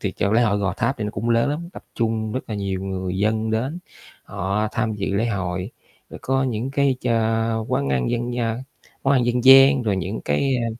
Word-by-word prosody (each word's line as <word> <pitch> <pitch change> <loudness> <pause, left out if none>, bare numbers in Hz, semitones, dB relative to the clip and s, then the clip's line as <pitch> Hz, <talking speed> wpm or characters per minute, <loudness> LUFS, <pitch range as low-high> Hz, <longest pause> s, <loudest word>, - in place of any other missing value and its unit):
thì - - -2
chỗ 100 - -1
lễ 115 +2 +4
hội 105 -3 +2
Gò 95 -2 0
Tháp 135 - 0
thì 105 - -2
nó 105 - -2
cũng 110 +3 -3
lớn 115 +4 +2
lắm, 165 +4 -4
tập - - -11
trung 110 -2 -1
rất 130 - -2
là - - -2
nhiều 100 -2 -3
người 95 -1 -3
dân 110 +2 0
đến. 130 +9 -2 0.5
Họ 100 +4 -2
tham 110 -1 -1
dự 100 -1 -3
lễ 110 +4 +1
hội, 95 -2 -3 0.4
rồi - - -9
có 135 0 +1
những 125 0 -2
cái 140 -1 +1
cho 115 -1 0
quán 70 - 0
ăn 65 -2 0
dân 120 0 -2
gian 115 0 -2 0.4
món 135 - +2
ăn 130 -3 +3
dân 120 0 0
gian, 135 0 +8
rồi 105 -4 0
những 95 +4 -3
cái, 130 - +1
a, 120 -1 -1
110 Hz, 230 wpm, -22 LUFS, 100-125 Hz, 0.5 s, gian